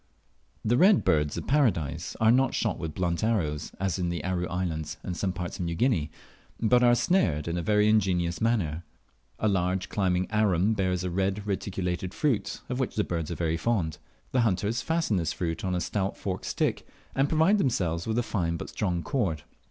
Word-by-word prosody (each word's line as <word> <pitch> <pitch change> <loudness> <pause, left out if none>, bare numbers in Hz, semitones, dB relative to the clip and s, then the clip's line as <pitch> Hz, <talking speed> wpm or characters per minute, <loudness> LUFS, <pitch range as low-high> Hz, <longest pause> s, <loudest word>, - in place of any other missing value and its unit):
The 120 +3 +3
Red 195 +1 +6
Birds 75 -2 +1
of - - -4
Paradise 115 - +1
are 110 0 +5
not 130 +2 +3
shot 110 -5 -1
with 80 -2 -5
blunt 85 +1 -1
arrows, 85 -10 0
as 95 -1 -1
in 90 -1 0
the 85 -3 -3
Aru 90 0 -1
Islands 85 -3 -3
and 90 - -4
some 95 +1 -1
parts 90 +1 -5
of 90 - -1
New 85 0 -2
Guinea, 85 - +1 0.5
but 125 +2 +4
are 120 -1 +6
snared 85 - +1
in 85 - -1
a 85 - -1
very 105 +3 +3
ingenious 90 -5 +2
manner. 90 -9 0 0.5
A 110 - 0
large 95 -1 0
climbing 95 -2 +1
Arum 105 -2 +2
bears 90 -3 0
a 90 - -2
red 95 +3 -1
reticulated 95 -2 -3
fruit, 140 -9 0
of 125 0 -3
which 130 - -2
the 105 - +2
birds 85 -4 -3
are 85 - -3
very 80 -1 0
fond. 85 -7 -1 0.3
The 130 - +2
hunters 110 +2 +1
fasten 165 - 0
this 85 -3 -1
fruit 80 -2 -3
on 95 -1 0
a - - 0
stout 95 +3 -2
forked - - -4
stick, - - -1 0.3
and 135 +1 +2
provide 165 +7 +4
themselves 90 - 0
with 110 0 0
a 120 - +2
fine 85 -7 -1
but - - -7
strong 90 -5 -1
cord. 90 - -1
95 Hz, 200 wpm, -27 LUFS, 85-110 Hz, 0.5 s, Red